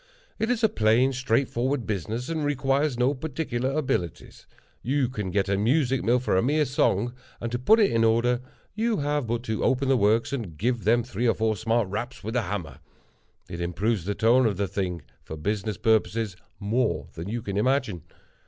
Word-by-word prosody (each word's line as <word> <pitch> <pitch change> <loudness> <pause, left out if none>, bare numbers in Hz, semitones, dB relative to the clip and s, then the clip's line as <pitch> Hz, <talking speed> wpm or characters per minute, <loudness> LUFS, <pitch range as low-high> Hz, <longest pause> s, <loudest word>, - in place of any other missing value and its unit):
It 220 +2 0
is 245 -2 0
a - - +7
plain, 125 - +3
straightforward 130 0 0
business, 110 +5 -3
and 160 -2 -2
requires 140 -1 +1
no 125 +3 +2
particular 135 -3 -3
abilities. 130 - -3 0.3
You 135 +1 +1
can 105 -7 -4
get 100 +1 0
a 100 - +1
music 130 +3 +2
mill 120 +2 +3
for 125 -5 0
a 95 - +4
mere 150 +5 +2
song, 120 -3 +1 0.3
and 115 - -4
to 120 - -2
put 220 - +5
it 205 - +4
in 115 0 +2
order, 120 +2 +2 0.3
you 225 +1 0
have 145 -3 -1
but 120 +1 -2
to 110 -3 -2
open 135 +1 +1
the 135 - +5
works, 115 +2 +2
and 105 - -4
give 120 +3 -1
them 120 +2 +4
three 120 0 -2
or 115 - +3
four 110 0 +1
smart 115 +1 0
raps 115 +6 -5
with 110 +4 -4
a 125 - +3
hammer. 85 - -5 0.7
It 85 - -6
improves 90 +3 -1
the 100 +1 -2
tone 120 +2 +4
of 100 -4 -1
the 100 0 0
thing, 90 -5 -3 0.2
for 80 - -8
business 105 +4 -2
purposes, 110 -2 +1 0.2
more 110 +4 0
than 85 +4 -6
you 115 +1 -3
can 100 - -4
imagine. 110 - +1
120 Hz, 195 wpm, -26 LUFS, 105-130 Hz, 0.7 s, a